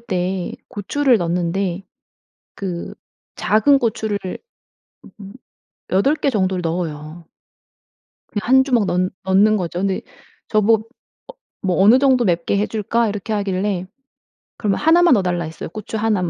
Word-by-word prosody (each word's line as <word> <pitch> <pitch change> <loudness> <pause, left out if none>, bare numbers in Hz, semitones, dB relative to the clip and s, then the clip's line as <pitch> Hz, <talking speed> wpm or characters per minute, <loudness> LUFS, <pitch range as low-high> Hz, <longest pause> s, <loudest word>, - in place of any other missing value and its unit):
때 185 -4 -2 0.2
고추를 250 +4 +1
넣는데 175 +2 -1 0.7
그 180 -3 -5 0.4
작은 270 +7 +3
고추를 220 -3 -1 1.0
음 200 0 -10 0.6
8 235 +11 +3
개 280 - 0
정도를 190 -4 0
넣어요. 165 -1 -4 1.0
그냥 210 +2 -5
1 265 0 +6
주먹 240 -7 +1
넣 180 - 0 0.2
넣는거죠. 190 -2 +2
근데 195 -1 -1 0.5
저보 220 +1 +2 0.7
뭐 190 -1 +1
"어느정도 255 +3 +5
맵게 175 +1 0
해줄까?" 220 +2 0
이렇게 205 +1 -4
하길래 195 -2 -1 0.7
그러면 205 -3 0
1 325 +3 +4
만 345 -5 +6
넣어달라 180 -3 0
했어요 160 +1 -7
고추 215 +4 -6
1 215 -3 +1
만. 170 - -1
200 Hz, 235 characters per minute, -20 LUFS, 180-225 Hz, 1.0 s, 1